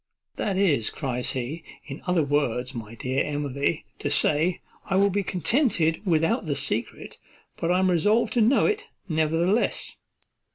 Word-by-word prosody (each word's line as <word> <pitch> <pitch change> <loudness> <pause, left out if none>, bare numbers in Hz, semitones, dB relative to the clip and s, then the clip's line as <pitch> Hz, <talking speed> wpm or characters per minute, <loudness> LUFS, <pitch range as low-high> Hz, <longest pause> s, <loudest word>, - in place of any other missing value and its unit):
"That 195 -3 -1
is," 155 - +2
cries 125 -3 -2
he, 135 +6 -4 0.2
"in 140 0 -8
other 180 -3 +2
words, 135 -3 0
my 115 -2 -7
dear 130 +4 -1
Emily, 145 +1 -2
to 145 - -2
say, 155 +4 +2 0.3
I 190 - +1
will 200 +1 +4
be 200 +2 +1
contented 180 - +1
without 170 +5 +1
the 145 - 0
secret, 125 -5 -3 0.4
but 165 - -1
I 180 - +3
am 185 0 +3
resolved 210 +7 +2
to 240 - +2
know 235 +5 +4
it, 425 -1 0 0.2
nevertheless." 165 +6 0
160 Hz, 155 wpm, -25 LUFS, 140-190 Hz, 0.4 s, will